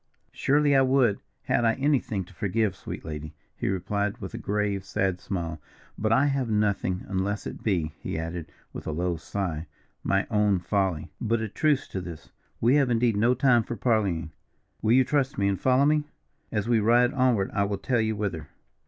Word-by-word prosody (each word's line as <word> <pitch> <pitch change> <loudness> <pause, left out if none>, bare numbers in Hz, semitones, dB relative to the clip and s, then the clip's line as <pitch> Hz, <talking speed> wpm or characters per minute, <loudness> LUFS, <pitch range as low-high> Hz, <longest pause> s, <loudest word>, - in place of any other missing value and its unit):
"Surely 145 0 +2
I 135 - +6
would, 130 -5 +3 0.2
had - - +1
I 115 -1 +4
anything 135 -8 0
to 95 - -17
forgive, 105 +3 0
sweet - - -8
lady," 75 -1 -6 0.2
he - - -3
replied, 100 +2 -1
with 95 - -7
a - - -5
grave, 100 -1 -1
sad 95 -1 -1
smile. 85 -5 -4 0.3
"But 110 +1 -1
I 135 +4 +4
have 135 -4 0
nothing, 100 -3 0
unless 100 +1 -2
it - - -6
be," 85 -8 0
he - - -4
added, 80 +1 -5 0.2
with - - -7
a - - -1
low 85 +3 -1
sigh, 85 -2 -4 0.4
"my 100 0 +1
own 105 -2 +3
folly. 90 -3 -1
But 115 0 +1
a 110 - -2
truce 145 +6 +1
to 95 - -4
this, 85 -4 -9 0.3
we 125 +5 +4
have 140 -3 +3
indeed 115 -1 +2
no 120 +5 +3
time 125 -2 +4
for 120 - -5
parleying. 100 -10 0 0.5
Will 110 - +3
you 130 +1 +6
trust 140 0 0
me 100 0 +2
and 100 -1 -1
follow 130 +2 +4
me? 150 0 +2 0.5
As 105 0 -1
we 120 -2 +3
ride 120 +4 +4
onward 125 -7 +2
I 100 - +2
will 100 0 -2
tell 120 +1 0
you 110 0 0
whither." 95 -7 -3
105 Hz, 195 wpm, -26 LUFS, 95-120 Hz, 0.5 s, I